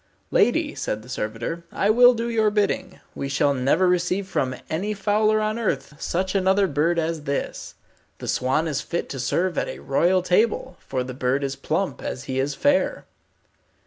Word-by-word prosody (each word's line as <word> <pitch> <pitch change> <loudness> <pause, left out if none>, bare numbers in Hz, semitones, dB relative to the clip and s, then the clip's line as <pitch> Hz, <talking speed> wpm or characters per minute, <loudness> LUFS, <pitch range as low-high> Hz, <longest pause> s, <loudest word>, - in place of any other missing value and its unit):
"Lady," - - +2
said 110 0 -3
the 125 - -14
servitor, 115 +7 -4
"I 200 - +2
will 245 +2 +7
do 230 +1 -2
your 220 -2 +2
bidding. 210 -1 -1
We 140 - -4
shall 140 +1 +2
never 140 +8 +2
receive 180 +2 +1
from 130 -8 -1
any 200 +7 -2
fowler 215 +2 +2
on 215 +2 -1
earth 160 - -2
such 185 +2 -1
another 195 0 +3
bird 165 +2 +1
as 160 -2 -2
this. 140 -1 -3 0.4
The - - -8
swan 135 +6 +1
is 150 -3 -1
fit 170 - -3
to 135 - -5
serve 170 +8 0
at - - -2
a - - -6
royal 175 +6 +2
table, 185 +1 +1
for 130 - -3
the 130 0 -6
bird 130 +2 0
is 135 0 -2
plump 160 +7 -2
as 125 - -5
he 130 0 -3
is 140 +1 -1
fair." 285 0 +1
170 Hz, 180 wpm, -24 LUFS, 135-200 Hz, 0.4 s, will